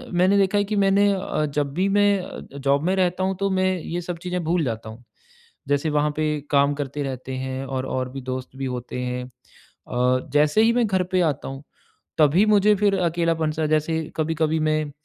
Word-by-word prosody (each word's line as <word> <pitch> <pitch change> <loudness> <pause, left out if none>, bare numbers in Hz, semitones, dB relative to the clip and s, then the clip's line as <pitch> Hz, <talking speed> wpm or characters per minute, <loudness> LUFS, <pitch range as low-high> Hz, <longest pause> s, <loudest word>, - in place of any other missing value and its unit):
मैंने 185 +3 +4
देखा 195 +1 +2
है 205 - +3
कि 210 - -2
मैंने 200 +1 +4
अ, 185 -5 -1
जब 145 -2 -1
भी 185 +5 +1
मैं 205 0 +3
अ, 185 - -8 0.2
जॉब 140 +1 +1
में 185 +3 +1
रहता 180 0 +1
हूँ 190 0 0
तो 200 0 +1
मैं 185 0 +1
ये 170 +2 -4
सब 175 0 -5
चीज़ें 180 -1 -2
भूल 170 +1 +1
जाता 110 -2 -4
हूँ। 115 +3 -12 0.7
जैसे 145 +2 +1
वहाँ 150 0 +1
पे 155 - +1 0.3
काम 140 0 +4
करते 145 0 -4
रहते 130 -1 -5
हैं 130 +1 -4
और 130 -1 -3
और 130 -1 -2
भी 135 +1 -7
दोस्त 130 0 -5
भी 135 - -3
होते 125 +1 -6
हैं 125 0 -3
अ, 125 0 -4
जैसे 150 +7 +4
ही 230 +1 +4
मैं 240 -2 +2
घर 190 -2 +1
पे 185 - +3
आता - - -8
हूँ 135 +1 -8 0.6
तभी 160 +7 +5
मुझे 210 0 +5
फिर 200 0 +2
अकेलापन 165 -2 0
सा 155 0 -2
जैसे 155 +1 0
कभी-कभी 160 0 0
मैं 155 -1 0
155 Hz, 205 wpm, -23 LUFS, 135-185 Hz, 0.7 s, तभी